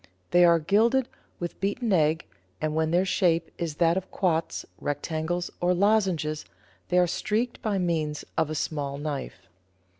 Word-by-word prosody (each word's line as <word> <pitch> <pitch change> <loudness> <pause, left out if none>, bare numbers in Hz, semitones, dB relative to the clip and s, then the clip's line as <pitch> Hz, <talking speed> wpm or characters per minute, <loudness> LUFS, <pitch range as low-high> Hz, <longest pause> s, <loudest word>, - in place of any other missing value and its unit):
They 175 0 +6
are 170 -1 +6
gilded 225 +10 +3 0.3
with 175 -1 -5
beaten 205 +3 0
egg, 155 -1 +2 0.3
and 155 0 -1
when 160 0 +1
their 175 +3 +3
shape 175 -3 +1
is 165 -3 -2
that 170 +2 +3
of 190 - -4
quoits, 165 -4 -1
rectangles, 160 +4 -2
or 180 +1 +3
lozenges, 185 -6 +1 0.5
they 180 - +2
are 180 - +6
streaked 215 +7 -1
by 210 -3 0
means 160 -4 -1
of 160 -2 +1
a 155 - -3
small 140 -2 -2
knife. 140 -10 -5
170 Hz, 155 wpm, -27 LUFS, 155-190 Hz, 0.5 s, They